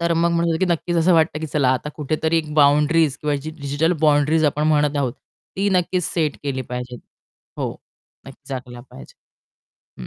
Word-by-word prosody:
तर 170 0 +1
मग 170 +1 +2
म्हणू 170 0 +1
शकतो 160 - -1
की 190 - +4
नक्कीच 170 +1 -2
असं 170 +2 +3
वाटतं 160 -1 +2
की 160 - -3
चला 145 -3 +1
आता 130 +3 -3
कुठेतरी 155 +2 -1
एक 155 -2 -5
बाउंडरीज 150 +1 +3
किंवा 150 -1 0
डिजिटल 150 +2 -2
बाउंडरीज 155 +1 +3
आपण 150 0 +1
म्हणत 150 -1 +2
आहोत, 130 -4 0 0.4
ती 200 +1 +1
नक्कीच 180 -1 +1
सेट 155 -4 -1
केली 135 -2 -3
पाहिजे. 125 0 -5 0.6
हो, - - -2 0.6
नक्कीच - - -14
झाकला 125 -2 -7
पाहिजे. 65 - -13 0.9
हं. 60 - -7
150 Hz, 180 wpm, -21 LUFS, 140-165 Hz, 0.9 s, की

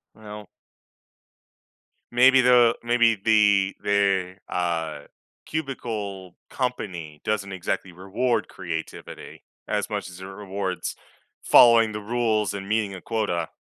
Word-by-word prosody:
Well 105 -2 -10 1.7
maybe 130 +1 +6
the 120 -2 +5
maybe 120 -1 +3
the 100 -2 +3
the, 95 -2 +1
uh, 85 -3 -2 0.5
cubicle 110 - -5
company 90 - -4
doesn't 100 -2 -2
exactly 95 0 -3
reward 105 +7 -1
creativity 85 -3 -7 0.2
as 105 +1 -2
much 100 -3 -4
as 90 0 -12
it 95 - -8
rewards 95 -1 -5 0.5
following 115 -2 +6
the 105 - -5
rules 110 -2 0
and 100 -1 -6
meeting 105 -2 0
a 95 - -8
quota. 100 -8 -2
100 Hz, 110 wpm, -24 LUFS, 95-115 Hz, 1.7 s, maybe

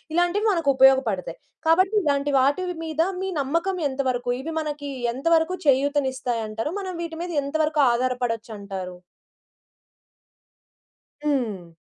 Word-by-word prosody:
ఇలాంటివి 350 +5 +2
మనకుపయోగపడతాయి. 265 - +3 0.3
కాబట్టి 370 +6 +4
ఇలాంటి 285 -1 +1
వాటివి 350 +7 +1
మీద 315 0 -1 0.2
మీ 385 - -2
నమ్మకం 335 +7 -1
ఎంతవరకు? 260 -2 -2
ఇవి 325 +4 -5
మనకీ 295 -2 -4 0.2
ఎంతవరకు 325 +6 +2
చేయూతనిస్తాయంటారు? 260 -4 0
మనం 375 -1 -5
వీటి 330 -1 -6
మీద 355 - -5
ఎంతవరకు 305 +1 +1
ఆధారపడొచ్చంటారు? 225 -7 -3 2.2
హ్మ్. 220 - -2
280 Hz, 95 wpm, -24 LUFS, 245-325 Hz, 2.2 s, కాబట్టి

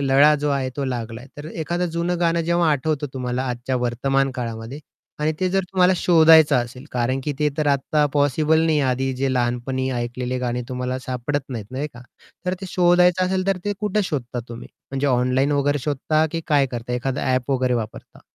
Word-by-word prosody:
लळा 140 +2 +5
जो 150 - +1
आहे 135 -2 0
तो 140 - -1
लागलाय. 120 -1 -5
तर 145 - -8
एखादं 175 +2 -2
जं 170 +1 -1
गाणं 170 0 +2
जेव्हा 170 -1 +2
आठवतं 145 +1 0
तुम्हाला 125 0 -2
आजच्या 125 +1 -2
वर्तमान 135 +3 0
काळामध्ये 115 +2 -5 0.4
आणि 155 +1 +1
ते 185 - +2
जर 195 +1 +2
तुम्हाला 185 0 +4
शोधायचं 160 -4 +6
असेल 125 +2 -3
कारण, 125 +2 0
की 150 - -1
ते 150 - +2
तर 150 - +1
आत्ता 145 +2 +2
पॉसिबल 150 +2 +2
नाहीये 155 -2 +2
आधी 130 +1 -1
जे 135 0 0
लहानपणी 125 +2 -1
ऐकलेले 125 +1 -3
गाणी 125 0 -2
तुम्हाला 125 0 -3
सापडत 130 +3 -2
नाहीत 115 -5 -5
नाही 140 +4 -3
का? 120 - -11 0.4
तर 180 - +1
ते 190 - -5
शोधायचं 180 +1 +4
असेल 185 0 -1
तर 195 -1 +2
ते 205 - 0
कुठे 210 0 +1
शोधता 125 -8 -3
तुम्ही 115 0 -9 0.2
म्हणजे 135 +1 -1
ऑनलाईन 130 +2 +2
वगैरे 145 0 +1
शोधता 155 +2 +1
की 165 - -2
काय 145 -4 +3
करता 120 -1 -5
एखादं 130 +3 -2
ॲप 130 0 0
वगैरे 130 -2 +1
वापरता? 110 -2 -6
135 Hz, 190 wpm, -22 LUFS, 125-155 Hz, 0.4 s, शोधायचं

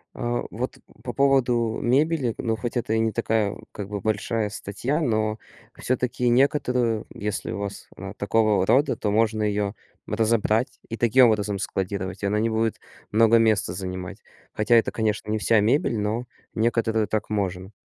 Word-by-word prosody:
Э, 120 0 -1
вот, 125 +4 -4 0.3
по 120 - -4
поводу 125 -5 +2
мебели, 135 0 +1
ну, 115 -2 -1
хоть 120 +3 -4
это 110 -2 -1
и 110 - +2
не 110 -1 +1
такая, 110 -2 0 0.2
как 100 -2 -6
бы, 100 -1 -5
большая 110 +1 -1
статья, 120 +10 -3
но 110 -6 0 0.4
всё-таки 125 0 -1
некоторую, 125 -3 +2
если 105 0 -3
у 100 - -4
вас 100 -1 -6
она 95 +1 -7
такого 105 -2 +2
рода, 135 +9 +3
то 105 - -1
можно 110 0 +2
ее 105 -1 0 0.3
разобрать 115 +1 +1
и 115 - -4
таким 120 +3 +5
образом 105 -3 0
складировать, 95 0 -3
и - - +1
она 105 +2 +1
не 115 +1 +1
будет 110 0 0 0.3
много 115 +1 +5
места 110 -5 +2
занимать. 90 -1 -6 0.3
Хотя 110 +2 +2
это, 115 - +3
конечно, 110 -1 -1
не 110 - +1
вся 110 0 +3
мебель, 115 +1 +2
но 110 +4 -1 0.3
некоторую 110 -1 +1
так 110 +1 -2
можно. 95 -2 -2
110 Hz, 165 wpm, -24 LUFS, 105-120 Hz, 0.4 s, таким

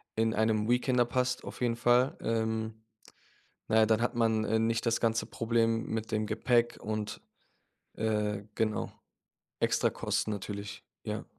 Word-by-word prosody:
in 110 0 +2
einem 110 0 +1
Weekender 125 0 +3
passt 125 +1 -1
auf - - -8
jeden 120 -1 +1
Fall. 120 +3 +3
Ähm, 110 -1 -2 0.8
na 110 - +3
ja, 110 - +6
dann 110 +1 +2
hat 120 +1 0
man, 110 -2 +2
äh, 110 - +2
nicht 115 +1 +1
das 115 - +2
ganze 115 -1 +1
Problem 115 0 +1
mit 110 0 -3
dem 110 -1 0
Gepäck 120 +2 +1
und, 110 0 -4 0.7
äh 105 -2 -1
genau, 110 -1 -1 0.7
Extrakosten 110 - +1
natürlich, 100 0 -6 0.2
ja. - - -4
110 Hz, 140 wpm, -30 LUFS, 110-115 Hz, 0.8 s, ja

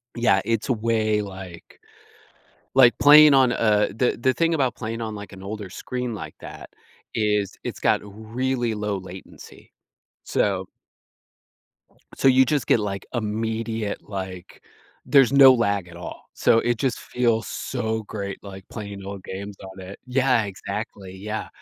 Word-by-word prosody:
Yeah, 120 -5 +3
it's 115 +1 -1
way 110 -2 +1
like 95 -4 -10 1.0
like, 125 -2 +6
playing, 150 0 +9
on, 130 -2 +5
uh, 105 -3 +2
the 120 +4 +1
the 130 +2 +2
thing 165 +6 +1
about 130 -6 +1
playing 115 -1 -5
on 110 -1 -4
like 105 -1 -9
an 95 -1 -11
older 100 -1 -6
screen 125 +5 -4
like 105 - -7
that - - -10 0.4
is, 105 -3 0
it's - - -5
got - - +3
really 115 +4 -3
low 105 -1 -2
latency, 95 0 -12 0.5
so 95 -2 0 1.5
so - - +2
you 130 0 +6
just 145 0 0
get, - - +4
like, 100 -2 -4
immediate, 110 -1 -2
like 95 -3 -7 0.4
there's 135 -2 +5
no 135 -1 +9
lag 100 -6 0
at 85 - -13
all, 85 - -9
so 115 - +3
it 120 0 0
just 130 0 -1
feels 115 -3 0
so 110 -3 -3
great, 100 -2 -5
like, 95 -1 -10
playing 100 -3 -7
old 100 -1 -7
games 100 +2 -7
on 95 0 -10
it. 95 +2 -9
Yeah, 125 -2 +2
exactly, 95 -1 -6
yeah, 105 +3 -5
110 Hz, 150 wpm, -24 LUFS, 100-120 Hz, 1.5 s, playing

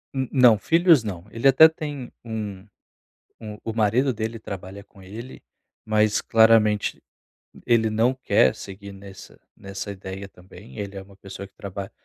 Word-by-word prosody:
Hum, 130 -1 -1
não, 125 -5 +6
filhos 165 -6 +4
não. 90 -4 -6
Ele 115 +4 +1
até 135 +4 +8
tem 145 -5 -7
um 105 -4 -6 0.7
um 105 -1 -8
o 115 - -3
marido 115 +5 +1
dele 110 +1 -4
trabalha 100 -1 -8
com 100 -1 -20
ele, 115 +7 -10 0.4
mas 110 0 +1
claramente 110 -2 +3 0.6
ele 115 -2 +3
não 115 +4 +2
quer 130 - +2
seguir 100 +1 -10
nesse 95 0 -13 0.2
nessa 95 +1 -7
ideia 95 0 -8
também. 95 +4 -15
Ele 100 -1 -6
é 95 - -6
uma 95 0 -16
pessoa 100 0 -9
que 95 - -36
trabalha 100 0 -7
105 Hz, 155 wpm, -23 LUFS, 100-115 Hz, 0.7 s, até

